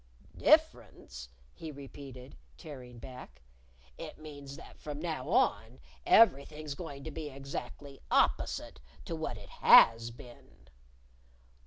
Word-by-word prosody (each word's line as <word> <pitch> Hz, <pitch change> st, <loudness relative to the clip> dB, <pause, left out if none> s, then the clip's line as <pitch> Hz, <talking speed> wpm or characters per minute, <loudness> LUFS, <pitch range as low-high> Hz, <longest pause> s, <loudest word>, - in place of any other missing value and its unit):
"Difference?" -, -, +1 dB, 0.2 s
he 160 Hz, -1 st, -8 dB
repeated, 135 Hz, -2 st, -11 dB, 0.2 s
tearing 125 Hz, -5 st, -10 dB
back; 115 Hz, -, -11 dB, 0.6 s
"it -, -, -8 dB
means 145 Hz, -3 st, -10 dB
that -, -, -14 dB
from 150 Hz, -1 st, -6 dB
now 160 Hz, -5 st, -4 dB
on 65 Hz, -, +1 dB, 0.3 s
everything's 150 Hz, -7 st, +4 dB
going 140 Hz, -3 st, -8 dB
to 160 Hz, -, -6 dB
be 155 Hz, 0 st, -6 dB
exactly 140 Hz, 0 st, -8 dB
opposite -, -, +1 dB, 0.3 s
to 165 Hz, -, -4 dB
what 155 Hz, -9 st, -4 dB
it 100 Hz, -, -13 dB
has 115 Hz, 0 st, +6 dB
been." 120 Hz, +1 st, -15 dB
140 Hz, 115 wpm, -31 LUFS, 125-155 Hz, 0.6 s, has